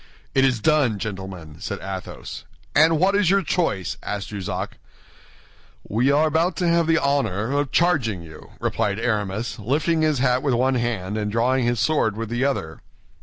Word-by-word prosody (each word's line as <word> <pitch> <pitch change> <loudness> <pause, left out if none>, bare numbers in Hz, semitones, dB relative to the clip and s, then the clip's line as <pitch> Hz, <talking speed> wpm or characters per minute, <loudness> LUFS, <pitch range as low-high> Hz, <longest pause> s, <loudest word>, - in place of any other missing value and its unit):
"It 135 - +4
is 130 -4 +2
done, 140 -5 +2
gentlemen," 95 -7 -6
said - - -4
Athos. 95 -1 -7 0.3
"And 160 +1 +5
what 190 +5 +3
is 205 -4 +3
your 195 0 +3
choice?" 125 - -1
asked 100 -2 -4
Jussac. 95 -1 -5 1.1
"We 120 +6 +1
are 150 +2 +4
about 165 +3 +1
to 180 - 0
have 170 -1 +3
the 165 0 +4
honor 135 - 0
of 145 -1 0
charging 130 - +1
you," 80 -1 -13
replied 100 -1 -1
Aramis, 110 0 -2
lifting 155 +9 +1
his 155 -2 +2
hat 125 0 +2
with 135 -4 +1
one 130 +2 +2
hand 110 -5 -1
and 105 -1 -2
drawing 125 +3 +2
his 120 -1 +1
sword 115 -7 +1
with 115 -1 -4
the 120 +2 -1
other. 80 - -2
120 Hz, 170 wpm, -23 LUFS, 105-155 Hz, 1.1 s, And